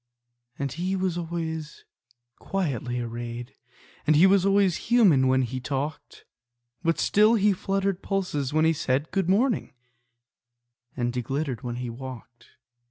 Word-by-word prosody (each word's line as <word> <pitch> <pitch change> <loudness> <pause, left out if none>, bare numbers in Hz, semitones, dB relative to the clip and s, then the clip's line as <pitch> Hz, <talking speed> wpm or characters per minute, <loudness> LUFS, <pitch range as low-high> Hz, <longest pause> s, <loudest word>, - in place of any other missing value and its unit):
And 140 -1 -3
he 180 +6 -2
was 185 -2 -1
always 160 -2 -5 0.5
quietly 130 - -2
arrayed, 120 +1 -6 0.5
And 155 - +5
he 160 +5 +7
was 195 0 +4
always 195 -1 +2
human 190 - +5
when 130 0 +3
he 130 +1 -3
talked; 140 +3 -5 0.6
But 165 0 +1
still 215 +3 +4
he 210 -1 +3
fluttered 195 0 -1
pulses 180 -9 -2
when 155 +1 +3
he 165 - +4
said, 140 0 -1
"Good 190 -3 0
morning," 230 - +1 1.2
and 120 0 -1
he 125 - 0
glittered 135 0 -3
when 120 -3 -4
he 120 -1 -4
walked. 120 -1 -10
155 Hz, 140 wpm, -26 LUFS, 130-190 Hz, 1.2 s, he